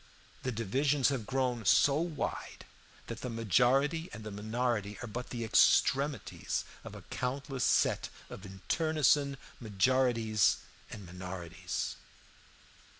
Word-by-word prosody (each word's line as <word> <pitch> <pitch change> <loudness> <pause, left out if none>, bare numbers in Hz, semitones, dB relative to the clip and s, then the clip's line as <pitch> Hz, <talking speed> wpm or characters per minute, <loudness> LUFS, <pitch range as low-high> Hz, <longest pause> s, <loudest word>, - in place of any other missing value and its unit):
The 125 - -2
divisions 130 +6 +1
have 125 -7 -3
grown 130 -3 0
so 140 +8 +5
wide 165 -1 -4 0.4
that 115 0 -7
the 125 - -4
majority 125 - +2
and 110 - -8
the 105 - -6
minority 110 0 -2
are - - -4
but 120 +3 -6
the 120 -2 -4
extremities 135 +5 +2 0.2
of - - -9
a - - -10
countless 135 0 -3
set - - +2 0.2
of 95 - -10
internecine 140 - +1 0.2
majorities 115 0 +2 0.3
and 100 -3 -9
minorities. 90 -1 -5
120 Hz, 115 wpm, -32 LUFS, 105-135 Hz, 0.4 s, so